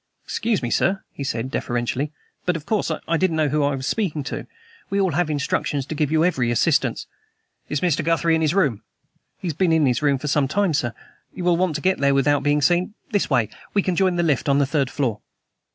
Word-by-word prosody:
"Excuse 215 - -1
me, 120 - -2
sir," 190 +1 +1
he 140 - -6
said 130 -1 -3
deferentially, 120 +5 -2 0.4
"but, 180 - +2
of 155 -2 -6
course, 210 -4 0 0.2
I 165 - +2
didn't 185 -1 +1
know 155 -2 +2
who 150 +1 +1
I 140 -1 +1
was 130 -1 -5
speaking 160 -8 -1
to. - - -5 0.4
We 200 - 0
all 190 -3 +2
have 175 -1 0
instructions 145 -1 -1
to 150 - -5
give 150 -1 0
you 160 +1 +3
every 130 -10 +1
assistance." 120 - +1 0.6
"Is 145 - -1
Mr. 170 -3 +1
Guthrie 165 +1 +2
in 160 - +2
his 155 +2 +1
room?" 140 - +2 0.6
"He's 175 -4 -3
been 170 +3 +1
in 160 -2 +4
his 125 0 +1
room 140 -2 +3
for 150 - -5
some 145 -1 +2
time, 190 +3 +1
sir. 125 -5 -1 0.4
You 180 - -5
will 175 -1 +3
want 175 -2 0
to - - -2
get 190 0 +1
there 140 0 +3
without 145 +1 +3
being 145 +1 +1
seen? 175 +6 +2 0.2
This 205 -2 +1
way. 120 -7 +2 0.3
We 200 - +3
can 185 - 0
join 185 0 +2
the 175 - +1
lift 150 -3 +1
on 140 - +4
the 140 - +3
third 140 -2 0
floor." 120 -8 -2
150 Hz, 230 wpm, -22 LUFS, 140-175 Hz, 0.6 s, in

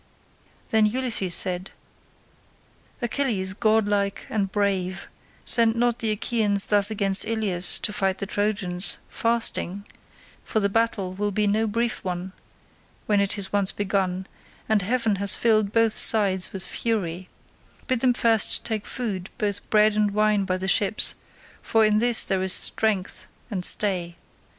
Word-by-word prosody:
Then 220 -1 +3
Ulysses 220 -6 -1
said, 185 0 -2 1.3
"Achilles, 225 -7 -1
godlike 205 -2 0
and 200 -3 -2
brave, 190 -3 -2 0.4
send 230 -1 +3
not 240 0 0
the 225 - 0
Achaeans 210 -2 +1
thus 205 0 +5
against 200 -3 +2
Ilius 200 -6 +3
to 210 - -3
fight 195 -2 -1
the 200 - -4
Trojans 200 -3 0
fasting, 225 -4 -1 0.6
for 220 - -2
the 200 -1 0
battle 205 -4 -1
will 205 +2 -2
be 210 +1 -1
no 215 +2 +1
brief 230 +2 -2
one, 180 0 -5 0.7
when 205 -2 +1
it 200 0 -1
is 190 -1 -4
once 200 -2 +2
begun, 190 -2 -2 0.4
and 215 -2 +1
heaven 225 0 0
has 200 0 +3
filled 215 -3 +1
both 225 -1 +2
sides 195 -4 +2
with 190 -1 -2
fury; 185 -6 -4 0.6
bid 255 -2 -1
them 250 0 +2
first 225 -3 +1
take 220 -3 -3
food 200 -7 -4
both 205 -2 -3
bread 215 0 +3
and 210 -1 +1
wine 210 -2 +1
by 185 0 -1
the 190 +1 -5
ships, 205 +2 +3 0.5
for 225 -1 +2
in 215 0 +2
this 240 0 +4
there 190 -2 -1
is 190 0 +2
strength 210 -4 0 0.2
and 185 -3 -3
stay. 180 -4 +1
205 Hz, 145 wpm, -23 LUFS, 190-220 Hz, 1.3 s, thus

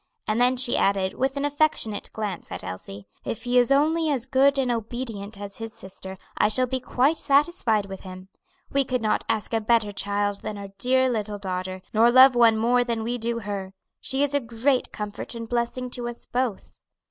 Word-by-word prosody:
And 215 +3 +1
then 250 +1 +3
she 250 -1 +3
added, 195 -1 +1
with 270 +1 -1
an 280 - 0
affectionate 290 -8 0
glance 205 -5 -5
at - - -4
Elsie: 95 +2 -8 0.2
"If 225 - -4
he 245 0 +3
is 245 +1 +2
only 315 +3 +3
as 260 -5 0
good 275 +1 +3
and 260 -2 +1
obedient 225 -3 -4
as 200 -1 -7
his 225 -1 -7
sister, 190 0 -9 0.2
I 210 - +3
shall 255 +4 +2
be 260 +1 -2
quite 265 +5 +1
satisfied 280 - +2
with 195 -1 -8
him. 185 0 -10 0.4
We 275 0 +3
could 250 -3 -2
not 215 - +1
ask 220 +1 -1
a 225 - +1
better 220 -1 +2
child 205 0 -1
than 210 - -5
our 200 -1 -7
dear 260 +1 +3
little 210 -4 -2
daughter, 185 -1 -4
nor 225 +2 +5
love 260 +2 +8
one 230 -2 +5
more 245 +2 +3
than 230 -2 -2
we 240 +2 -2
do 230 +1 -2
her; 200 -2 -5 0.2
she 270 +1 0
is 285 0 0
a 285 - +3
great 245 +2 0
comfort 210 +3 -6
and 230 -1 -6
blessing 245 +1 -2
to 240 -1 -4
us 240 - -9
both." 245 -5 -3
230 Hz, 205 wpm, -25 LUFS, 205-255 Hz, 0.4 s, love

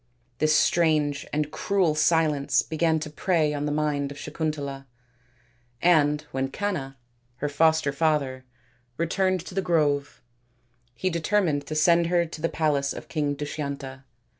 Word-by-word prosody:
This 155 0 +3
strange 155 -4 +2
and 150 0 -1
cruel 180 0 +1
silence 155 -2 +2
began 160 0 +1
to 155 - -5
prey 155 -1 +1
upon 145 0 -2
the - - -1
mind 145 -2 -1
of 145 - -9
Sakun 155 +1 -2
tala, 140 -2 -7 0.9
and 150 -4 +3
when 135 0 -1
Canna, 135 -4 -4 0.4
her 140 +4 -3
foster 160 0 +2
father, 140 -3 0 0.5
returned 185 +2 0
to - - -9
the 195 - 0
grove, 150 -5 0 0.7
he 185 +8 -1
determined 165 -4 0
to 155 - -4
send 170 +2 +4
her 170 0 +2
to 160 -1 -9
the 165 - +1
palace 145 -3 0
of - - -10
King 145 -3 -1
Dushyanta. 140 -2 -5
155 Hz, 145 wpm, -25 LUFS, 145-165 Hz, 0.9 s, send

